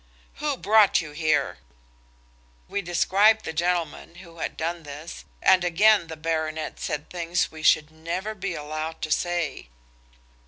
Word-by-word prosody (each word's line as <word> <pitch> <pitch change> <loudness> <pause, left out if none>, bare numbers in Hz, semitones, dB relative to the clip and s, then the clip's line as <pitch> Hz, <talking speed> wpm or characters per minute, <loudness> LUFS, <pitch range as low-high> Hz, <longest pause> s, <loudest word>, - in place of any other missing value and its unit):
"Who 295 -2 -1
brought 210 -2 +5
you 155 -4 -6
here?" 155 - 0 1.1
We 200 - -2
described 200 +5 +3
the 160 - -4
gentleman 170 -1 -1
who 170 -2 -13
had - - -4
done 170 +2 -2
this, 150 +2 -9 0.2
and 185 -1 +5
again 195 +2 +4
the 160 -1 -8
baronet 160 -1 -3
said 150 +1 -3
things 175 0 -1
we 160 - -10
should 155 0 +4
never 170 +7 -4
be 195 -3 -4
allowed 155 +2 -5
to 155 - -3
say. 170 - -1
170 Hz, 145 wpm, -25 LUFS, 155-185 Hz, 1.1 s, brought